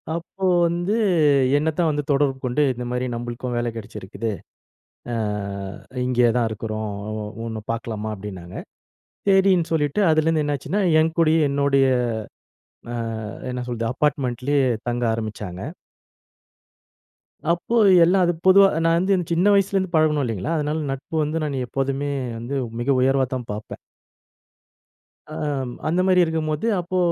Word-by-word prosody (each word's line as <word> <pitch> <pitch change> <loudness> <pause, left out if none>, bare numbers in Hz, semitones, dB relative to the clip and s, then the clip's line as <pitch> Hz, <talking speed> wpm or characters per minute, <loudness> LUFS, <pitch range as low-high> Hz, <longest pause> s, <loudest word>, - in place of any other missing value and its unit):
அப்போ 175 +3 -8 0.2
வந்து 175 +5 -1 0.6
என்னத்தான் 160 +2 +1
வந்து 145 0 -2
தொடர்பு 140 -1 +2
கொண்டு, 125 +4 0
இந்தமாரி 125 +1 -3
நம்பளுக்கும் 120 +1 -4
வேல 120 0 0
கெடச்சிருக்குது. 110 0 -5 0.8
ஆ - - -1 0.9
இங்கே 125 -1 +3
தான் 120 -2 +2
இருக்கிறோம். 110 0 -4 0.2
ஒ - - -4
ஒ - - -5 0.2
ஒன்ன 110 -1 -5
பார்க்கலாமா? 110 -2 -4
அப்பிடின்னாங்க. 95 -3 -8 0.7
சேரின்னு 190 -3 +4
சொல்லிட்டு, 150 +2 0
அதுலேருந்து 155 0 +2
என்னாச்சுன்னா, 145 +8 -1 0.2
என் 160 0 +2
கூடயே 160 0 +4
என்னோடய 140 -1 +2 1.1
ஆ - - -2 0.5
என்ன 125 0 -4
சொல்றது? 115 -2 -2
அப்பார்ட்மெண்ட்லேயே 140 -1 0 0.3
தங்க 120 0 -1
ஆரம்பிச்சாங்க. 105 -5 -5 1.9
அப்போ 175 +7 -1 0.3
எல்லா 185 +3 +3
அது 175 - +1
பொதுவா 195 +1 +8 0.2
நான் 165 0 +4
வந்து 190 +3 +2 0.2
சின்ன 170 +3 +2
வயசுல 195 0 +2
இருந்து 185 -2 -2
பழகுனோம் 155 -2 +3
இல்லேங்களா? 115 - -2
அதனால 150 +1 -1
நட்பு 135 +4 -6
வந்து 155 +2 -2
நானு 140 -4 -2
எப்போதுமே 135 +2 -2 0.3
வந்து 120 +5 -5 0.3
மிக 120 - -3
உயர்வாதான் 130 -2 +1
பார்ப்பேன். 105 +1 -7 1.5
ஆ, 155 - -10 0.5
அந்தமாரி 180 +2 +3
இருக்கும்போது, 160 +3 -2
அப்போ 180 +1 -3
140 Hz, 125 wpm, -22 LUFS, 120-165 Hz, 1.9 s, பொதுவா